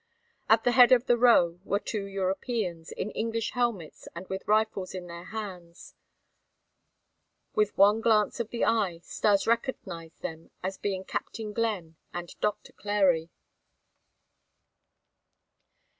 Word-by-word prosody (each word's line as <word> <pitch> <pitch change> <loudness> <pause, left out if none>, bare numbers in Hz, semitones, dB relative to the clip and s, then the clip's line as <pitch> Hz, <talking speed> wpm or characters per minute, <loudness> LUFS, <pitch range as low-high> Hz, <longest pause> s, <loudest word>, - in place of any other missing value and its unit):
At 225 0 +5
the 245 - +3
head 245 -1 +7
of 250 -1 +5
the 240 - +4
row 205 -8 +4
were 200 - 0
two 205 0 -4
Europeans, 190 -2 -2
in 210 - -4
English 225 0 -2
helmets 235 -10 -2
and 175 +2 -7
with 190 0 -5
rifles 210 -3 +1
in 180 -1 -6
their 170 0 -9
hands. 185 -4 -8 1.6
With 210 -1 +1
one 205 +3 +5
glance 220 0 +2
of 230 -2 -2
the 235 - 0
eye 195 -7 +1
Stas 200 +2 +1
recognized 190 -9 -3
them 160 0 -6
as 190 +1 -3
being 190 -2 -2
Captain 215 +2 -5
Glenn 200 -8 -2 0.2
and 175 -1 -5
Doctor 210 -1 -2
Clary. 190 -5 +1
200 Hz, 130 wpm, -28 LUFS, 180-225 Hz, 1.6 s, head